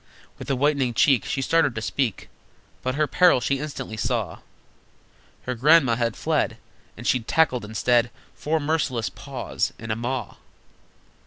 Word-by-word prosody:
With - - -8
a 135 - +2
whitening 135 -3 +1
cheek 135 -4 +4
She 135 - -2
started 160 -4 +2
to 110 - -3
speak, 115 -5 -2 0.5
But 130 +1 -2
her 155 +1 +2
peril 175 +1 +4
she 135 +3 -1
instantly 135 -6 -6
saw: 100 - -2 1.0
Her 125 - -3
Grandma 135 0 +4
had 115 -1 -1
fled, - - 0 0.4
And 120 - -9
she'd 125 -3 +1
tackled 145 -7 +2
instead 115 +3 +1 0.2
Four 160 +2 -1
merciless 145 - -1
Paws - - -4
and 110 0 -6
a - - 0
Maw! 120 +1 -4
130 Hz, 150 wpm, -24 LUFS, 115-145 Hz, 1.0 s, cheek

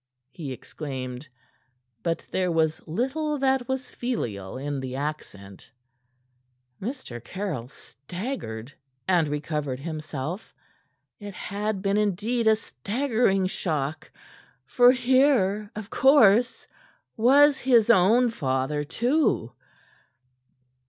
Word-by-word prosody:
he 145 -1 -7
exclaimed; 130 0 -7 0.7
but 165 +4 -2
there 185 -1 0
was 160 -1 +1
little 270 - -1
that 265 -2 +1
was 265 -1 -3
filial 115 - -4
in 140 +1 -3
the 130 -1 -5
accent. 105 -10 -6 1.1
Mr. 190 - -6
Caryll 175 - -4
staggered 135 - -7 0.3
and 175 -4 +3
recovered 150 -2 -3
himself. 155 +3 -6 0.6
It 205 -2 -8
had 205 -1 -3
been 200 0 +1
indeed 210 +3 0
a 220 - +6
staggering 220 -3 0
shock; 155 -5 -3 0.6
for 245 - +6
here, 250 -6 +2
of 215 0 -7
course, 245 -4 +4 0.5
was 275 +4 +5
his 235 -4 +4
own 230 +5 +4
father, 135 - -1
too. 250 - 0
190 Hz, 100 wpm, -26 LUFS, 145-245 Hz, 1.1 s, a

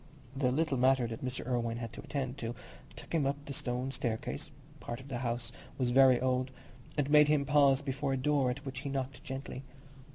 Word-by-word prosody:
The 130 -2 +2
little 150 0 +1
matter 130 0 +4
that 115 +1 -5
Mr. 130 0 -3
Irwine 115 -2 0
had 115 -2 -5
to - - -8
attend 135 -1 -3
to 115 -1 -3 0.4
took - - -10
him 150 -5 +2
up 140 - +1
the 145 - -6
old - - -4
stone 125 +2 -2
staircase 110 - -3 0.3
(part 120 +1 -5
of 130 +1 -12
the 125 -3 -3
house 120 -1 -2 0.3
was 125 -2 +1
very 130 -1 +7
old) 130 0 +1 0.5
and 145 -2 +2
made 150 0 +7
him 150 -2 +3
pause 140 -1 +4
before 135 0 -1
a - - 0
door 135 -1 +2
at 135 +3 -4
which 135 -2 -5
he 140 +1 -4
knocked 135 -1 -3
gently. 135 -1 -6
130 Hz, 215 wpm, -32 LUFS, 125-140 Hz, 0.5 s, very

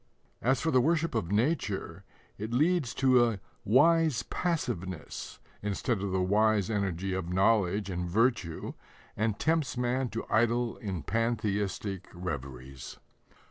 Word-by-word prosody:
As 130 +1 +2
for 160 - +1
the 130 - +5
worship 165 +4 +1
of 100 -6 -1
nature, 105 - -1 0.4
it 110 +2 -4
leads 150 +1 +2
to 130 -2 +5
a 115 -4 0 0.2
"wise 155 +3 +4
passiveness" 95 - -3 0.2
instead 105 +2 -1
of 100 -1 -2
the 95 0 +1
wise 105 +1 +2
energy 95 -2 -1
of 95 -2 -3
knowledge 100 0 +2
and 90 -2 -3
virtue, 105 -5 0 0.4
and 110 -1 0
tempts 160 -6 0
man 125 +1 0
to 115 - -4
idle 120 +1 +1
in 95 -8 -4
pantheistic 105 -2 -1
reveries. 70 -6 -6
110 Hz, 130 wpm, -30 LUFS, 95-125 Hz, 0.4 s, the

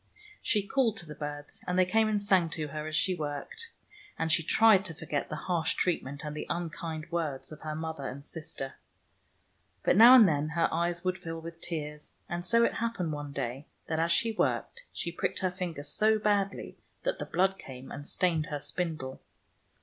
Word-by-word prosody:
She 210 -4 +1
called 230 -1 +2
to 175 - -3
the 155 - -8
birds, 145 0 -7
and 180 0 0
they 185 - +6
came 220 +4 +3
and 210 -1 +2
sang 190 -4 +3
to 155 -2 -3
her 155 +1 -4
as 155 - -3
she 185 +4 +3
worked, 155 - -4 0.5
and 160 - 0
she 165 - +4
tried 210 +3 +5
to 165 -4 -2
forget 155 -3 -3
the - - -3
harsh 170 -3 +1
treatment 145 -5 -1
and 150 0 -4
the - - -5
unkind 165 -1 -4
words 155 -6 -2
of 155 - -10
her 155 -1 -4
mother 160 -3 -4
and 140 +2 -7
sister. 150 -4 -6 1.1
But - - +4
now 235 +5 +10
and 225 -6 +9
then 150 -1 +1
her 165 - +4
eyes 170 +1 0
would 185 0 -1
fill 165 -1 -5
with 165 +1 -9
tears, 150 -3 -4
and 175 -2 -3
so 230 +6 +4
it - - +3
happened 225 -8 -1
one 145 -1 -5
day, 135 +1 -4 0.2
that 160 -1 -1
as 165 +1 +2
she 170 +7 +3
worked, 465 - -1
she 170 - -3
pricked 185 +2 -2
her 185 -1 +1
finger 175 -5 -4
so 215 +9 +3
badly 205 -2 0 0.2
that - - -1
the - - -3
blood 195 +1 +1
came 130 0 -10
and 145 - -7
stained 165 -3 +1
her 150 -4 -3
spindle. 145 -2 -3
165 Hz, 200 wpm, -30 LUFS, 150-190 Hz, 1.1 s, now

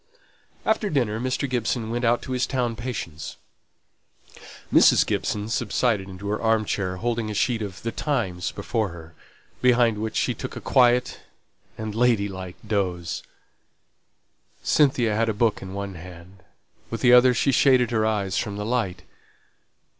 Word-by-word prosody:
After 220 -1 +1
dinner, 120 - 0
Mr. 130 +3 -1
Gibson 120 -2 -2
went 120 +1 -2
out 120 0 +2
to - - -7
his 125 -1 0
town 125 -3 -1
patients; 100 - -6 1.4
Mrs. - - +6
Gibson 105 0 -2
subsided 110 -3 0
into 95 +2 -7
her 105 - -2
arm 110 -1 +2
chair, 95 -3 -2
holding 115 +1 -2
a 105 - -4
sheet 115 +2 +1
of 95 -5 -6
The 115 - -2
Times 110 - -2
before 110 -3 -2
her, 85 -1 -11 0.5
behind 120 -3 +3
which 110 +1 -4
she - - +1
took - - -7
a - - -5
quiet 125 0 +3 0.6
and 110 -1 -4
lady 115 -3 +2
like 95 -2 -7
doze. 90 -5 -2 1.4
Cynthia 130 -7 +3
had 115 +1 +1
a 110 - -1
book 110 0 +1
in 95 0 -7
one 100 -1 -4
hand, 90 +2 -12 0.5
with 115 -1 -5
the 125 -1 +6
other 125 0 +7
she 135 - +2
shaded 130 -2 +4
her 110 -2 +1
eyes 105 -3 0
from 105 -3 -4
the 105 - -4
light. 110 -7 -1
110 Hz, 155 wpm, -24 LUFS, 100-125 Hz, 1.4 s, other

